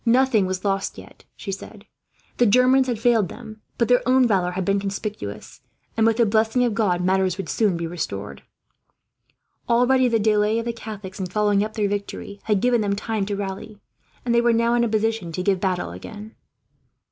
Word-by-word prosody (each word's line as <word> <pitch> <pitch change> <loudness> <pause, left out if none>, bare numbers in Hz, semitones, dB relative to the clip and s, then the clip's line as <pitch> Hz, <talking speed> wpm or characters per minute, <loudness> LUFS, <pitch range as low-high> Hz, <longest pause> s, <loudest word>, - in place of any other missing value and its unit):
Nothing 240 -4 +3
was 185 +1 -4
lost 195 -1 -1
yet, - - -14
she 195 - -6
said; 200 +2 -9 0.5
the 240 - +4
Germans 255 +4 +4
had 240 -3 -1
failed 225 -4 +2
them, 220 -2 -11 0.2
but 235 - +1
their 245 0 +4
own 260 0 +5
valour 190 -5 +1
had 185 0 -2
been 200 +1 +2
conspicuous, 200 +2 -6 0.3
and 225 0 +3
with 225 -1 +2
the 235 - +4
blessing 220 +3 +2
of 240 -3 +1
God 195 -6 +1
matters 190 0 +1
would 195 -4 -5
soon 205 -6 +1
be 170 - -3
restored. 100 - -5 1.3
Already 250 +2 +4
the 230 -2 +2
delay 210 0 +2
of 230 - -2
the 235 - -2
Catholics 210 -4 -8
in 185 - -2
following 205 +1 +1
up 215 +1 -5
their 210 -2 +1
victory 200 0 -5
had 210 -3 +1
given 245 -2 +2
them 200 -1 0
time 210 -1 -2
to 205 - -2
rally, 200 +1 -6 0.5
and 240 - +1
they 235 - +4
were 235 0 +3
now 230 +1 +2
in 240 0 +3
a 235 - +1
position 220 -4 -1
to 180 - -3
give 195 -1 +1
battle 180 - -1
again. 210 - -10
210 Hz, 200 wpm, -23 LUFS, 195-230 Hz, 1.3 s, own